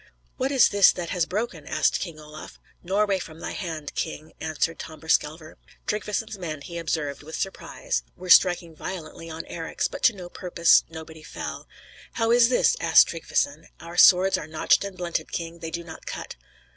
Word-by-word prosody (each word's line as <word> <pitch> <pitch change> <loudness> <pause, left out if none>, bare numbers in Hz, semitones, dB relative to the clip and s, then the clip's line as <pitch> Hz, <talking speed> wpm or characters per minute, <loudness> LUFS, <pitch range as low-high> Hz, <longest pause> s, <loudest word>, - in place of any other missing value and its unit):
"What 265 +1 -1
is 270 -3 +5
this 200 -2 +6
that 175 -2 -5
has 175 -2 0
broken?" 190 -7 -4
asked - - +1
King 170 -4 -6
Olaf. 150 0 -11 0.2
"Norway 195 +1 +1
from 160 -2 -9
thy - - -5
hand, 160 -6 -5
King," 155 +1 -5
answered 160 +1 -1
Tamberskelver. 155 0 -2 0.3
Tryggveson's 210 0 -3
men, 155 -5 -5
he 170 +3 -7
observed 150 -4 -2
with 155 +2 -8
surprise, 355 - -3 0.2
were 185 - -9
striking 175 -3 +5
violently 165 -1 -7
on 160 0 -6
Eric's; 165 -1 -3
but - - -8
to 230 - +6
no 180 -2 -8
purpose; 175 -1 +3
nobody 160 -1 -10
fell. - - -7 0.5
"How 230 0 +1
is 240 0 +6
this?" 255 - +3
asked 165 -1 +6
Tryggveson. 160 -2 -2
"Our 170 +2 -9
swords 185 +2 +6
are 150 - -7
notched 155 +4 +2
and 200 -2 -7
blunted, 175 -2 -3
King; 170 0 -5
they 165 - -5
do 170 +1 -5
not 160 -1 -11
cut." - - -6
170 Hz, 175 wpm, -25 LUFS, 160-190 Hz, 0.5 s, this